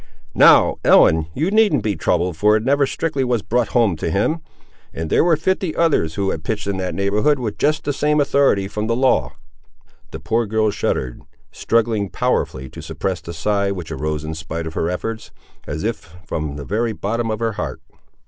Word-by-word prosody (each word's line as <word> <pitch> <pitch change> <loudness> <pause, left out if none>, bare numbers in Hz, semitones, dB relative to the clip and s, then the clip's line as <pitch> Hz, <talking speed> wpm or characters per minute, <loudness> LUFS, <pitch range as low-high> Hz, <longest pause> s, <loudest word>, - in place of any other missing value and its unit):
Now, - - +6
Ellen, 80 0 +5
you 160 +7 0
needn't 210 - +3
be 105 -2 0
troubled 90 +2 0
for 105 +6 +3
it 110 - 0
never 140 0 +3
strictly 155 -3 -2
was 120 -4 0
brought 120 +4 0
home 115 -7 +2
to 80 - -2
him; 105 - 0 0.6
and 80 -1 -4
there - - +4
were 170 -1 +4
fifty 185 0 -1
others 145 - +1
who 100 -1 0
had 80 - -5
pitched 105 -3 -3
in 100 -1 -2
that 95 -1 -3
neighbourhood 105 +9 +2
with 120 -5 -5
just 155 +1 +1
the 145 - -1
same 150 +2 +1
authority 140 -9 +2
from 105 +2 -4
the 115 - +1
law." 130 +1 +2 0.8
The - - -8
poor 115 0 0
girl 110 0 +1
shuddered, 65 -9 -2 0.3
struggling 110 -3 0
powerfully 65 -6 -1
to - - -10
suppress 95 -3 -3
the 85 - -8
sigh 100 +4 0
which 90 -4 -6
arose 75 +1 -3
in 80 +1 -4
spite 85 0 -5
of 80 - -6
her 80 - -1
efforts, 110 +5 -4 0.4
as 75 +2 -4
if 105 -7 -4
from 75 -2 -4
the 70 -1 -7
very 115 +2 -1
bottom 115 +3 -2
of 110 - -1
her 115 0 -1
heart. 100 - -5
105 Hz, 195 wpm, -20 LUFS, 85-125 Hz, 0.8 s, Now